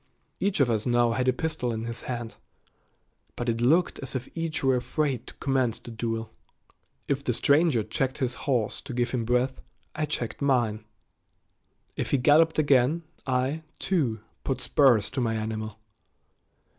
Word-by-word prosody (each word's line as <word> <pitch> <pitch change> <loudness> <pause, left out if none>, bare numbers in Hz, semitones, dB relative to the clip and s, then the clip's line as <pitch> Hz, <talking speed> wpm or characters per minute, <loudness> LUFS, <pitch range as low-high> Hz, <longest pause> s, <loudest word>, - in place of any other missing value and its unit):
Each 200 -3 0
of 140 - +5
us 110 -1 0
now 120 -1 +3
had 125 +3 0
a - - +6
pistol 140 -2 -2
in 110 0 -3
his 115 0 -5
hand, 120 -2 -5 1.0
but 120 - -4
it 115 0 0
looked 160 +9 +3
as 135 0 -6
if 130 0 -3
each 165 -3 -3
were 135 -1 +4
afraid 130 -1 -1
to - - -11
commence 130 -4 0
the 120 - -10
duel. 115 0 -3 0.8
If 140 0 0
the 125 - 0
stranger 140 -2 +3
checked 130 +5 -1
his 130 -4 -1 0.2
horse 120 -5 0
to 125 - -7
give 120 0 0
him 120 -3 -1
breath, 125 +2 +1 0.3
I 155 0 -1
checked 125 -4 -3
mine. 120 -6 +1 1.1
If - - -2
he 140 - +3
galloped 155 +5 +4
again, 145 +2 +3 0.2
I, 130 +4 0 0.2
too, 135 - 0 0.2
put 130 -2 -1
spurs 130 -6 +4
to 130 - -2
my 115 -2 0
animal. 110 -1 -4
125 Hz, 165 wpm, -27 LUFS, 115-140 Hz, 1.1 s, a